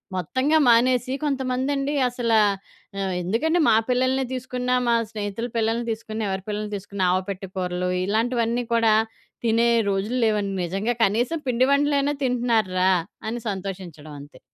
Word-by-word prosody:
మొత్తంగా 260 - +1
మానేసి 250 +2 +3
కొంతమందండి 275 +1 -1 0.2
అసలా 230 -2 +1 0.6
ఆహ్, 190 -1 -1
ఎందుకండి, 305 - +1
మా - - +5 0.2
పిల్లల‌నే 260 +1 +2
తీసుకున్నా, 250 0 -2
మా 235 - +4 0.2
స్నేహితుల 210 +1 -4
పిల్లల‌ని 225 +1 0
తీసుకున్నా, 220 0 -5
ఎవరి 190 0 -3
పిల్లల‌ని 210 0 -3
తీసుకున్నా, 200 -1 -3
ఆవపెట్టె 190 +1 -3
కూరలు, 180 0 -2 0.2
ఇలాంటివన్నీ 235 +3 0
కూడా 225 -2 +4 0.5
తినే 230 +1 +3 0.2
రోజులు 200 +6 -1
లేవండి 205 -3 0
నిజంగా. 195 +7 -1
కనీసం 240 +11 0
పిండి 250 +1 +3
వంటలైనా 285 0 +2
తింటున్నారు 235 -5 +1
రా 190 +1 +4 0.4
అని 240 +1 -4
సంతోషించడవంతే. 170 -7 -7
230 Hz, 130 wpm, -23 LUFS, 195-250 Hz, 0.6 s, మా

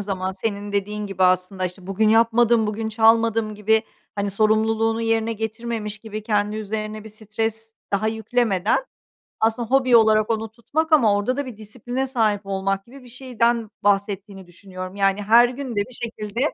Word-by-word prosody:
zaman 190 -2 -3
senin 205 +1 -4
dediğin 210 +1 -2
gibi 195 -1 -3
aslında 185 +1 +1
işte, 180 +1 -11
"Bugün 200 +3 +1
yapmadım, 230 0 +4
bugün 220 +1 -3
çalmadım," 225 -1 +3
gibi 220 +2 +2 0.3
hani 200 0 -2
sorumluluğunu 220 +2 +1
yerine 225 0 +1
getirmemiş 220 -1 -4
gibi 215 -1 -7
kendi 210 0 0
üzerine 215 0 -5
bir - - -9
stres 220 +1 -4 0.2
daha 205 +2 +1
yüklemeden, 220 - 0 0.6
aslında 225 +1 0
hobi 255 -3 +5
olarak 215 -1 +4
onu 225 -1 -1
tutmak 310 +8 -3
ama 230 -9 +5
orada 210 +6 -1
da 285 -1 -3
bir 240 -5 -8
disipline 245 +5 -4
sahip 220 -6 +1
olmak 195 0 -2
gibi 265 +3 -14
bir 250 - -14
şeyden 235 -3 -1
bahsettiğini 200 -1 -1
düşünüyorum. 185 +1 -9
Yani, 195 0 +1
her 235 +4 +6
gün 260 +1 -6
de - - +2
bir 255 - -14
şekilde 225 -1 -5
220 Hz, 165 wpm, -22 LUFS, 205-230 Hz, 0.6 s, her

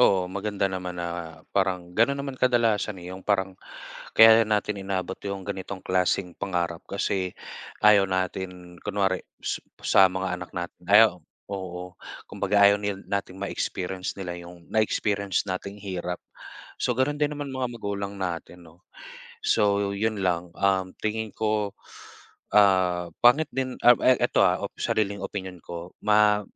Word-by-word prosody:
Oo, 95 -6 +5
maganda 100 +1 -2
naman 90 -1 -4
na 85 -2 -5
parang 90 -2 0
gano'n 115 +8 +3
naman 140 0 -4
kadalasan 115 -5 +2
eh. 90 - -7
'Yong 95 - -8
parang, 95 -1 0 0.6
kaya 110 0 +9
'yan 110 - -4
natin 105 -1 -1
inaabot 95 -1 -3
'yong 100 -1 -5
ganitong 95 -1 -6
klaseng 90 0 +1
pangarap 85 -3 -2
kasi 95 -2 -2 0.5
ayaw 100 -2 +6
natin 90 -1 -4
kunwari 95 -2 0 0.2
su - - -2 0.2
sa 95 -1 +6
mga 95 0 -2
anak 90 - -8
natin 85 +1 -5
ayaw 110 +2 +7 0.4
oo. 90 -2 -6 0.4
Kumbaga 100 +1 +2
ayaw 100 0 +3
nil 100 -1 -3
nating 100 -2 -2
ma-experience 95 -1 -3
nila 95 -3 -5
'yong 85 -1 -13
na-experience 100 -2 +1
nating 95 +2 -4
hirap. 90 -3 -4 0.6
So 125 - 0
gano'n 145 +3 +1
din 150 0 +2
naman 145 -2 -5
mga 130 -1 -2
magulang 100 -1 -4
natin 90 -1 -5
'no. 80 +3 -20 0.6
So 100 - +2
'yon 110 +1 -1
lang. 90 -1 0
Um, 95 -1 +2
tingin 110 0 -2
ko, 105 -2 0 0.8
ah, 95 -4 +4 0.2
pangit 135 +6 +6
din, 130 -1 -2
ah, 120 0 +9
eh, 130 - +5
eto - - +3
ha, - - +2
op - - -4
sariling 100 -1 0
opinyon 95 -3 -5
ko 85 +1 -8
ma 105 0 +5
100 Hz, 150 wpm, -26 LUFS, 90-105 Hz, 0.8 s, kaya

